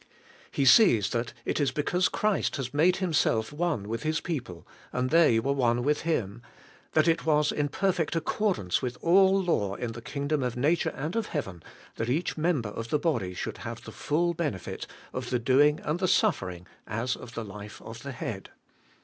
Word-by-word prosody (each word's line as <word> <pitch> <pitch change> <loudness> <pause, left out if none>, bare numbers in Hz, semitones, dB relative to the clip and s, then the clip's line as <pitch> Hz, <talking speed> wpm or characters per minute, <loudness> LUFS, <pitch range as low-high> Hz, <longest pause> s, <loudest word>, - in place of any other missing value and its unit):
He 140 - 0
sees 125 - +6
that 115 0 -1
it - - -1
is 145 -2 +2
because 180 +5 +1
Christ 210 -2 0
had 135 -2 -4
made 170 +5 +4
Himself 150 - +1
one 150 -10 -1
with 115 +1 -3
His 155 +3 0
people, 125 - -5 0.3
and 125 0 -1
they 160 -9 +5
were 135 +5 0
one 120 -3 +1
with 150 +2 +1
Him; 120 -9 -2 0.5
that 155 +1 +4
it 165 0 +2
was 150 -1 +3
in 145 -1 0
perfect 180 -1 0
accordance 165 - 0
with 125 0 -3
all 190 +3 +5
law 105 - 0
in 120 +1 -4
the 120 +1 -8
kingdom 140 +4 -2
of 125 -1 -2
nature 150 +6 +2
and 155 +7 -4
of 230 -2 -1
heaven, 95 - -4 0.4
that 115 +1 -2
each 155 +7 0
member 155 -9 0
of 115 +2 -6
the 150 - +2
body 115 - -1
should - - -5
have - - -7
the - - -9
full 170 +3 0
benefit 150 - -4 0.3
of 125 -1 -4
the 125 - +1
doing 140 +5 +4
and 155 +3 -1
the 185 - +1
suffering 90 - +1 0.2
as 115 +3 -1
of 120 - -11
the 115 - -4
life 105 +1 -9
of 115 +1 -9
the 140 - -6
head. 110 -5 -6
140 Hz, 190 wpm, -28 LUFS, 115-165 Hz, 0.5 s, sees